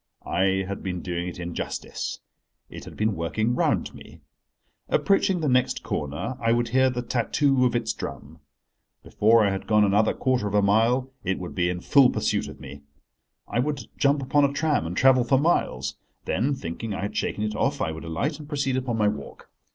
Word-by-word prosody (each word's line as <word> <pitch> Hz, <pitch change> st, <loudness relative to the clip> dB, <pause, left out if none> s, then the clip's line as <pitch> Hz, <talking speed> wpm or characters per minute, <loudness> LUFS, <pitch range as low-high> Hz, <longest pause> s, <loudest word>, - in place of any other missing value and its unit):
I 95 Hz, +1 st, +1 dB
had 100 Hz, -, -5 dB
been 90 Hz, -2 st, -4 dB
doing 90 Hz, -1 st, -3 dB
it 90 Hz, -, -6 dB
injustice: 85 Hz, -1 st, -5 dB, 0.5 s
it -, -, -9 dB
had -, -, -11 dB
been 110 Hz, -1 st, +1 dB
working 110 Hz, +8 st, -1 dB
round -, -, 0 dB
me. -, -, -14 dB, 0.7 s
Approaching 195 Hz, -2 st, +2 dB
the 155 Hz, -, 0 dB
next 125 Hz, -1 st, +1 dB
corner, 75 Hz, -, -3 dB
I 115 Hz, 0 st, +3 dB
would 120 Hz, 0 st, 0 dB
hear 130 Hz, +2 st, +3 dB
the 125 Hz, -1 st, -3 dB
tattoo 130 Hz, +2 st, +1 dB
of 125 Hz, -, +1 dB
its 115 Hz, -1 st, 0 dB
drum. 70 Hz, +4 st, -8 dB, 0.6 s
Before 110 Hz, +1 st, +3 dB
I 100 Hz, -, +2 dB
had 95 Hz, -, -4 dB
gone 105 Hz, -1 st, +4 dB
another 105 Hz, +2 st, +2 dB
quarter 130 Hz, -5 st, 0 dB
of 100 Hz, -, -2 dB
a 105 Hz, -, +5 dB
mile 115 Hz, +6 st, +2 dB
it 95 Hz, +1 st, -1 dB
would 90 Hz, -1 st, -7 dB
be 90 Hz, -1 st, +1 dB
in 90 Hz, -1 st, -3 dB
full 135 Hz, +2 st, +5 dB
pursuit -, -, -1 dB
of -, -, -10 dB
me. 70 Hz, 0 st, -10 dB, 0.7 s
I -, -, -1 dB
would 140 Hz, -3 st, -2 dB
jump 140 Hz, 0 st, +2 dB
upon 145 Hz, +2 st, +2 dB
a 140 Hz, -, +3 dB
tram, 145 Hz, -, 0 dB
and 90 Hz, -, -5 dB
travel 130 Hz, -1 st, +5 dB
for 135 Hz, +3 st, +3 dB
miles. 70 Hz, -, 0 dB, 0.3 s
Then, 140 Hz, +4 st, 0 dB
thinking 100 Hz, +1 st, -5 dB
I -, -, -4 dB
had 100 Hz, -, -4 dB
shaken 105 Hz, -, -2 dB
it 105 Hz, 0 st, -2 dB
off, -, -, 0 dB
I 80 Hz, -, -1 dB
would 80 Hz, -, -8 dB
alight 140 Hz, -, -2 dB
and 150 Hz, -1 st, -11 dB
proceed 140 Hz, -3 st, 0 dB
upon 125 Hz, -3 st, -2 dB
my 105 Hz, -1 st, +3 dB
walk. 105 Hz, +1 st, -6 dB
115 Hz, 200 wpm, -25 LUFS, 95-130 Hz, 0.7 s, a